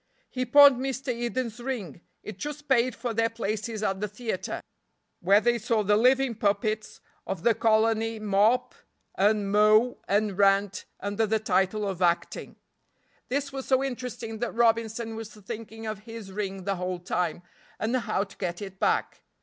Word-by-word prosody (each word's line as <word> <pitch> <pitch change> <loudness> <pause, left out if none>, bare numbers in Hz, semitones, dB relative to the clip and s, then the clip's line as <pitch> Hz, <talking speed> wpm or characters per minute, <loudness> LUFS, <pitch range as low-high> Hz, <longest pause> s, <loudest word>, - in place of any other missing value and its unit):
He 255 -1 -2
pawned 285 -2 +8
Mr. 265 0 -2
Eden's 240 0 -3
ring; 230 - -5 0.2
it 210 -3 -8
just 295 +2 -6
paid 255 -1 +2
for 235 -1 -3
their 230 +1 +1
places 220 -1 -3
at 190 -2 0
the 210 - -2
theater, 210 -1 -4 0.6
where 195 +4 +5
they 240 +1 +1
saw 225 -2 0
the 205 +1 +3
living 255 +3 +3
puppets 215 0 -1 0.3
of 190 -3 -4
the 235 - +5
colony 225 0 +2
mop 215 +3 +2 0.4
and 205 0 +2
mow 215 +4 +4
and 205 -1 0
rant 195 -1 +3 0.2
under 205 +2 0
the 220 +1 +2
title 205 0 0
of 190 -2 -4
acting. 175 -1 0 0.7
This 275 +1 -2
was 270 -1 -5
so 265 0 +3
interesting 245 -4 -5
that 240 -1 -3
Robinson 230 -1 +1
was 220 -1 -8
thinking 225 +1 -8
of 215 -2 -4
his 225 -2 -9
ring 195 -1 -4
the 195 0 -1
whole 180 0 -3
time, 175 -1 -2 0.4
and 225 +3 0
how 215 -5 0
to 200 - -13
get 175 -2 -3
it 190 -2 -8
back. - - 0
220 Hz, 165 wpm, -27 LUFS, 200-235 Hz, 0.7 s, pawned